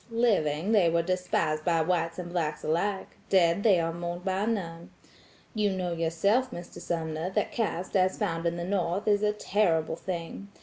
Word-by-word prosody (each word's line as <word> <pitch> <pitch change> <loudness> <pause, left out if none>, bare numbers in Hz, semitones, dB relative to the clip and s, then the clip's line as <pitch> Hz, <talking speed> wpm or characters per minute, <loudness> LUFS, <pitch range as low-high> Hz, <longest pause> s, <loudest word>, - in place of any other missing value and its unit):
Living, 205 -7 +1
they 200 -6 +5
were 170 0 +2
despised 170 -4 0
by 170 -1 +2
whites 165 0 0
and 175 -1 -6
blacks 155 -4 -2
alike; 190 +5 -1
dead, 175 -1 +4
they 200 -5 +5
are 165 0 -1
mourned 175 +1 -5
by 190 +2 0
none. 170 -7 -3 0.6
You 210 -3 +1
know 185 -2 -2
yourself 170 +10 +1
Mr. 175 -6 -9
Sumner, 160 0 -2
that 190 - -1
caste 190 -5 -2
as 185 -1 +3
found 170 -5 -1
at 170 0 -1
the 170 - -3
North 185 +1 -1
is 205 -1 +3
a 210 0 +3
terrible 180 -6 +1
thing. 175 +2 -6
175 Hz, 175 wpm, -28 LUFS, 165-200 Hz, 0.6 s, they